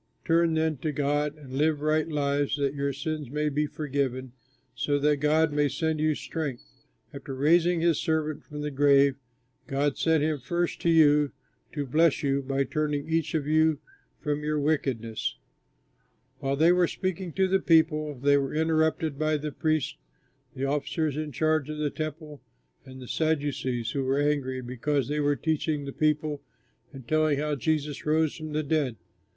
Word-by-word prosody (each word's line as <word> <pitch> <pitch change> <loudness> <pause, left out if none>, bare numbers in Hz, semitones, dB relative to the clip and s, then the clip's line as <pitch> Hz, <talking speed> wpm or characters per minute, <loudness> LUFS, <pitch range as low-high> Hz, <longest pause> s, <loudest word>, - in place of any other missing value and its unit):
Turn 165 0 +3
then 160 -1 +1
to 150 +4 -2
God 145 +1 -1
and 135 -4 -12
live 150 +2 +1
right 155 +1 +1
lives 145 -2 0
that 140 -1 0
your 140 -1 -1
sins 150 0 -4
may 150 +2 0
be 150 +1 0
forgiven, 140 -4 -3 0.4
so 145 -1 0
that 145 +1 +2
God 150 +2 +2
may 145 -1 +2
send 155 +3 -1
you 155 0 +2
strength. 145 -7 -4 0.5
After 140 -1 -7
raising 165 +5 +3
his 170 -2 +2
Servant 155 -2 -1
from 150 -1 -8
the 150 0 -3
grave, 140 0 +4 0.5
God 140 +1 0
sent 160 -2 +2
him 155 -1 0
first 170 +7 -2
to 170 - +1
you 150 -3 +5 0.4
to 145 -2 -2
bless 155 +4 +2
you 140 0 +1
by 135 0 0
turning 150 +1 -2
each 160 -1 0
of 150 -3 0
you 155 0 +3 0.4
from 150 -1 -2
your 150 0 0
wickedness." 130 -7 -1 1.0
While 135 0 -1
they 160 +4 +5
were 180 -1 +3
speaking 185 -1 -3
to 190 0 +2
the 190 +1 +2
people, 155 -3 +2
they 140 +2 +3
were 135 +1 -2
interrupted 160 -2 +1
by 155 0 +1
the 150 +1 -4
priests, 155 - -1 0.6
the 135 - -2
officer 145 +3 -1
in 150 +1 -4
charge 155 +1 +1
of 155 - -4
the 150 -1 -1
Temple, 155 -1 -6 0.5
and 130 0 -10
the 125 - -9
Sadducees, 140 -7 -1
who 140 - -1
were 135 +2 +1
angry 140 -3 0
because 130 +2 -1
they 150 +1 -1
were 145 0 +2
teaching 155 -1 -1
the 140 - -6
people 150 -1 0 0.5
and 135 -4 -11
telling 155 -2 +2
how 150 +1 -1
Jesus 150 +1 -1
rose 155 0 +1
from 155 -2 -7
the 155 +1 0
dead. 145 -5 0
150 Hz, 175 wpm, -27 LUFS, 140-155 Hz, 1.0 s, you